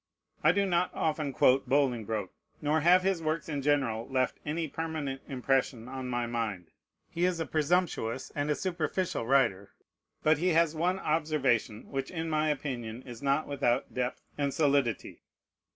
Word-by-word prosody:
I - - +7
do 200 0 +2
not 180 -1 +1
often 155 -2 -1
quote 130 0 +3
Bolingbroke, 115 -8 0 0.3
nor 150 +1 +1
have 180 +3 +5
his 190 -3 +1
works 155 0 -1
in 145 -3 -2
general 135 -6 +1
left 130 -1 0
any 160 +2 -2
permanent 150 -3 -4
impression 130 -3 0
on 130 0 -5
my 120 -1 -1
mind. 110 -7 -3 0.4
He 170 - -2
is 180 -2 +2
a 165 - -1
presumptuous 155 -7 0
and 145 -1 -2
a 150 - +2
superficial 175 -6 -2
writer. 110 -7 +2 0.5
But 155 0 +4
he 180 +1 +2
has 165 -1 +3
one 180 +4 +1
observation 150 - 0
which 135 -1 -2
in 165 -2 -3
my 155 0 +2
opinion 125 -5 -3
is 120 -3 -10
not 140 +2 +1
without 135 -3 0
depth 125 -1 -2 0.2
and 140 -1 +1
solidity. 140 -7 +1
140 Hz, 160 wpm, -30 LUFS, 125-160 Hz, 0.5 s, I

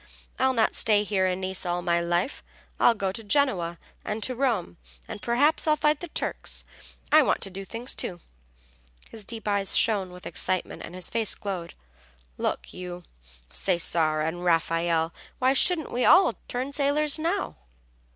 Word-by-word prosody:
"I'll 260 0 +3
not 225 -2 +2
stay 210 -2 +3
here 195 -3 +1
in 185 0 -1
Nice 190 0 -1
all 175 -1 -2
my 170 -1 +2
life; 175 +8 -1 0.4
I'll 235 - +5
go 195 -3 -1
to 225 +4 -7
Genoa 200 -8 +1 0.3
and 215 0 -3
to 255 - +1
Rome, 235 - -1 0.3
and - - -7
perhaps 285 +8 +2
I'll 305 - +5
fight 300 0 +2
the 350 - -6
Turks. - - -3 0.5
I 310 - +8
want 275 - +1
to 195 - 0
do 195 +1 -6
things, 235 +5 -4
too." 175 - -4 0.9
His 220 -2 -8
deep 225 0 -5
eyes 200 -2 +1
shone 200 -5 +2
with 180 0 -12
excitement 185 0 -1
and 175 - -9
his 185 - -6
face 225 -2 +1
glowed. 185 -4 -5 0.6
"Look - - -3
you, 180 -1 -7 0.5
Cesare 165 -4 +2
and 170 +3 -3
Raffaelle, 165 -1 +1 0.2
why 260 +1 +3
shouldn't 320 +2 +3
we 245 - 0 0.4
turn 255 +3 -3
sailors 290 +1 +2
now?" 345 +5 -1
200 Hz, 160 wpm, -26 LUFS, 175-260 Hz, 0.9 s, I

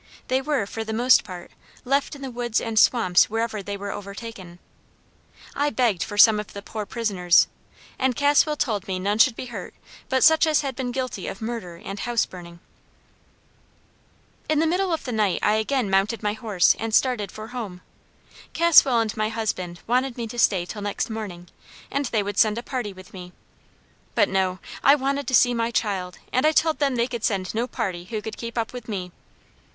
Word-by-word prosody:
They 260 +1 +2
were, 280 -6 0
for 225 +3 -5
the 220 0 -5
most 245 +3 +5
part, 180 -4 -9 0.3
left 275 +3 0
in 280 - -10
the 265 - -5
woods 240 -1 -1
and 225 -2 0
swamps 185 -9 +4
wherever 225 -1 -2
they 200 +1 -5
were 200 0 -5
overtaken. 200 -3 -8 1.0
I 290 +1 +1
begged 235 -10 +1
for 205 -2 -4
some 215 0 +7
of 210 - -7
the 200 - -8
poor 215 -1 -6
prisoners, 190 -7 +3 0.5
and 260 -1 +1
Caswell 290 +3 +3
told 215 -9 -2
me 190 -1 -2
none 200 +3 -1
should 240 0 +5
be - - -6
hurt - - -7 0.3
but 260 0 +2
such 320 0 +6
as 310 -1 +3
had 270 -3 -4
been 250 -1 -3
guilty 255 -6 -4
of 195 - -6
murder 220 -6 -5
and 195 +1 -6
house 240 0 0
burning. 170 -2 -11 1.9
"In 310 - +2
the 320 - +3
middle 365 +3 +1
of 325 - -1
the 250 - -5
night 210 -5 +1
I 210 - +3
again 245 +1 0
mounted 195 +4 +1
my 210 0 0
horse 215 -5 +2
and 225 0 -1
started 230 -7 +1
for 215 +1 -9
home. 215 -8 -6 0.7
Caswell 300 -8 +6
and 220 -1 -2
my 215 0 0
husband 185 -6 -3
wanted 255 +2 0
me 235 - -3
to 240 - -6
stay 190 -6 +3
till 205 +3 -7
next 205 +2 -3
morning, 190 -6 -6 0.4
and 280 0 -1
they 220 -3 0
would 205 0 -3
send 215 0 +4
a 235 - -4
party 245 -6 -4
with 185 -1 -14
me; 180 -1 -10 0.8
but 205 -4 +3
no! 190 -1 0 0.3
I 280 - +7
wanted 275 0 -2
to 260 - +2
see 245 0 +5
my 230 -1 0
child, 190 -6 -2 0.2
and 255 - +2
I 310 - +3
told 315 +1 +2
them 275 -3 +1
they 235 0 +2
could 235 -3 -6
send 190 -3 -1
no 230 +3 -1
party 190 -9 -4
who 215 +3 -4
could 220 - -6
keep 235 0 -7
up 225 0 -2
with 245 -3 -8
me. 185 -4 -4
225 Hz, 200 wpm, -24 LUFS, 200-255 Hz, 1.9 s, some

